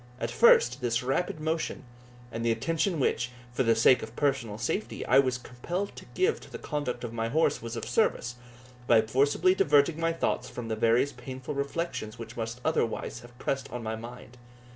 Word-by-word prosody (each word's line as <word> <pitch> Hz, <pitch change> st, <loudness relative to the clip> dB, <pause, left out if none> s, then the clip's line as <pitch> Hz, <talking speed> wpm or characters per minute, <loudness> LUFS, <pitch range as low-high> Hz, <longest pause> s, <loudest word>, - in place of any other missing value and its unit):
At 115 Hz, -, -2 dB
first, 125 Hz, -, +5 dB
this 120 Hz, 0 st, 0 dB
rapid 135 Hz, +5 st, -1 dB
motion, 160 Hz, +1 st, -2 dB, 0.5 s
and 115 Hz, 0 st, -4 dB
the 115 Hz, -, +2 dB
attention 165 Hz, -, 0 dB
which, 120 Hz, -2 st, +1 dB, 0.2 s
for 125 Hz, -, 0 dB
the 115 Hz, -3 st, +4 dB
sake 120 Hz, +3 st, +5 dB
of 110 Hz, +1 st, -8 dB
personal 130 Hz, -7 st, 0 dB
safety, 195 Hz, -, -3 dB
I 130 Hz, -, +5 dB
was 130 Hz, -2 st, +2 dB
compelled 170 Hz, +11 st, -5 dB
to -, -, -10 dB
give 390 Hz, +5 st, +2 dB
to -, -, -13 dB
the -, -, -5 dB
conduct 145 Hz, -5 st, -3 dB
of 120 Hz, -1 st, -5 dB
my 115 Hz, 0 st, -2 dB
horse, 160 Hz, +6 st, +2 dB
was 115 Hz, +1 st, -5 dB
of -, -, -4 dB
service, 125 Hz, -, 0 dB, 0.5 s
by 115 Hz, -2 st, +6 dB
forcibly 145 Hz, +10 st, +3 dB
diverting 150 Hz, -1 st, +3 dB
my 165 Hz, 0 st, +1 dB
thoughts 165 Hz, -, -1 dB
from 120 Hz, -2 st, -6 dB
the 110 Hz, -, 0 dB
various 115 Hz, +5 st, +3 dB
painful 130 Hz, +2 st, -7 dB
reflections 140 Hz, -5 st, -3 dB
which 115 Hz, +1 st, -8 dB
must 115 Hz, +2 st, -4 dB
otherwise 120 Hz, -6 st, -1 dB
have 120 Hz, 0 st, -15 dB
pressed 135 Hz, +1 st, -3 dB
on 120 Hz, -1 st, -5 dB
my 110 Hz, 0 st, -2 dB
mind. 120 Hz, +2 st, -10 dB
125 Hz, 190 wpm, -28 LUFS, 115-150 Hz, 0.5 s, by